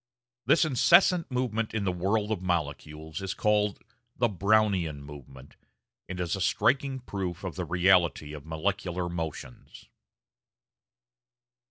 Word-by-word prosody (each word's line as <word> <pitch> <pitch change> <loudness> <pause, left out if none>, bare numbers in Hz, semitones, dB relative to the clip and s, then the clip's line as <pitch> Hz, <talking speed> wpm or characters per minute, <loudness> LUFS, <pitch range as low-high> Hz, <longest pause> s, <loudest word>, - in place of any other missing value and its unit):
This 165 - +5
incessant 170 +5 +4
movement 115 -4 -2
in 105 - 0
the 95 - 0
world 100 +4 -1
of 105 - -2
molecules 80 -2 -3
is 95 -1 -4
called 105 -1 +1 0.3
the 120 - +3
Brownian 100 -6 +1
movement, 70 -2 -13 0.5
and 95 0 -5
is 85 0 -1
a 95 - -5
striking 135 +7 +1
proof 95 -6 -5
of 90 -5 -5
the - - -3
reality 90 -4 +2
of 75 -2 -8
molecular 90 +2 -2
motions. 80 -7 -7
95 Hz, 125 wpm, -28 LUFS, 80-110 Hz, 0.5 s, This